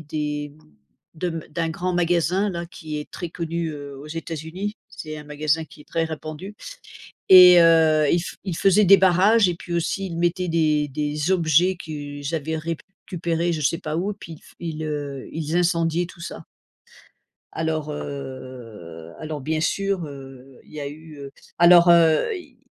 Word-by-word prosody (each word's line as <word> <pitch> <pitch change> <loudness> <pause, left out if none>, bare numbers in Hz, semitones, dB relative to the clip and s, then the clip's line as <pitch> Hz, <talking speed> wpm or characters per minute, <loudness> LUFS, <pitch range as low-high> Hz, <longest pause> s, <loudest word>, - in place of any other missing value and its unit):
des 150 -1 -4 0.6
de 175 +3 -2
m 165 -2 -4
d'un 165 +1 -2
grand 180 +3 -2
magasin 175 +3 +1
là, 170 -1 -5
qui 155 -2 -7
est 150 - -8
très 175 -2 -6
connu, 165 -1 -3
heu, 145 -2 -8
aux 145 - -10
États-Unis. 165 +5 -5
C'est 155 -6 -8
un 150 - -9
magasin 150 +2 -1
qui 150 - -17
est - - -14
très 165 - 0
répandu 155 +5 -7 0.7
et 180 -2 +10
heu, 160 -2 +5
ils 170 - +3
f - - -7
ils 180 -4 -3
faisaient 200 +2 +4
des 195 +2 +8
barrages 190 +3 +4
et 175 - -1
puis 175 - -9
aussi, 185 +3 -1
ils 170 - -6
mettaient 175 +1 0
des 155 -3 +2
des 150 +3 -2
objets 175 +1 +3
qu'ils 145 -2 -6
avaient 160 +1 -2
récupéré 170 0 -3
je 155 - -4
sais 145 +5 +1
pas 155 -3 -4
où 200 +4 -1
puis 165 -5 -10
ils - - -15
f - - -19
ils, 160 -2 -5
heu, 145 -3 -5
ils 160 +1 -2
incendiaient 170 -1 +1
tout 170 - -15
ça. 170 - -7 1.1
Alors, 155 -1 -2
heu, 125 - -8
alors, 155 -1 -5
bien 155 +3 -2
sûr, 195 +2 -1
heu, 135 -2 -12
il - - -20
y 150 - -7
a 140 - -4
eu, 155 0 -12
heu, 140 -1 -8 0.3
alors, 175 0 +7
heu, 170 - +4
il 275 -9 -13
160 Hz, 175 wpm, -23 LUFS, 150-175 Hz, 1.1 s, et